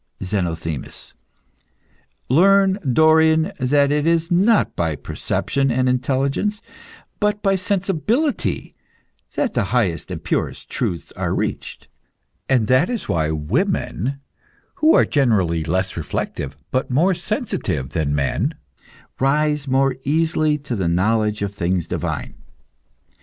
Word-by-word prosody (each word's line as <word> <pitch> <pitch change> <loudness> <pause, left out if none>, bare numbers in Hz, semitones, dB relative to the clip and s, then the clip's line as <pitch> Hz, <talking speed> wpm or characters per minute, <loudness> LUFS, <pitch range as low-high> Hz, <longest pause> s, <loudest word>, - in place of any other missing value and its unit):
ZENOTHEMIS. 85 -6 -3 1.1
Learn, 195 - +4
Dorion, 160 +4 +4
that 140 +2 +3
it 150 +1 +1
is 165 +1 +1
not 200 +5 +3
by 80 -3 -1
perception 135 - -1
and 130 +1 +1
intelligence, 135 +10 0 0.6
but 210 0 0
by 195 -1 +3
sensibility, 200 - -1 0.6
that 270 - 0
the 120 - +1
highest 100 -5 0
and - - -6
purest - - -3
truths 85 -5 -3
are - - -2
reached. - - -4 0.6
That 130 - +3
is 240 -3 -3
why 80 -2 0
women, 85 - -1 0.6
who, 310 +1 +6
generally, 95 - +1
are - - -7
less 95 +1 -1
reflective 70 -3 -4
but 130 - -1
more 165 +9 +3
sensitive 170 - -2
than 75 -3 -1
men, 70 -2 0 0.6
rise 150 +1 +1
more 135 0 +2
easily 155 0 +1
to 140 -4 -5
the 95 -5 -1
knowledge 105 +4 +1
of 100 0 -3
things 90 -2 -1
divine. - - -4
135 Hz, 115 wpm, -21 LUFS, -, 1.1 s, who